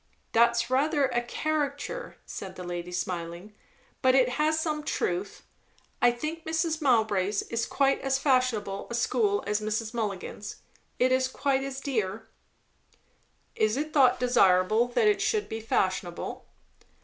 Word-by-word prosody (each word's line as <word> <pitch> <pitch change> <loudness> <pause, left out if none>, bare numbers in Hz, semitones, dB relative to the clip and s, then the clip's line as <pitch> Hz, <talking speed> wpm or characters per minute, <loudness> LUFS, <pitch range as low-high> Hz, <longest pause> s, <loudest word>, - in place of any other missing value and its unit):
"That's 235 +1 +3
rather 285 +2 +2
a 240 -2 0
caricature," 305 - -3
said 190 -1 -7
the 185 - -7
lady 175 0 -5
smiling; 175 +2 -4 0.5
"but 260 -1 +4
it 255 -2 +4
has 305 +4 +1
some 310 -1 -1
truth. 190 -8 -3 0.6
I 245 - +6
think 310 +7 -4
Mrs. 320 0 -1
Mowbray's 215 -7 +2
is 230 0 -1
quite 275 -1 +1
as 270 0 +1
fashionable 255 -8 0
a 235 - -3
school 220 -4 +1
as 210 0 0
Mrs. 215 +2 -2
Mulligan's. 205 -2 -4 0.4
It 255 +1 +3
is 260 0 +3
quite 270 +1 0
as 270 0 -5
dear." 220 -6 -2 1.3
"Is 215 +3 +1
it 305 +2 -3
thought 270 -4 +5
desirable, 215 -2 +4
that 245 - +2
it 415 -1 +3
should 430 -2 0
be 225 0 -5
fashionable?" 185 -5 -2
240 Hz, 140 wpm, -28 LUFS, 205-275 Hz, 1.3 s, I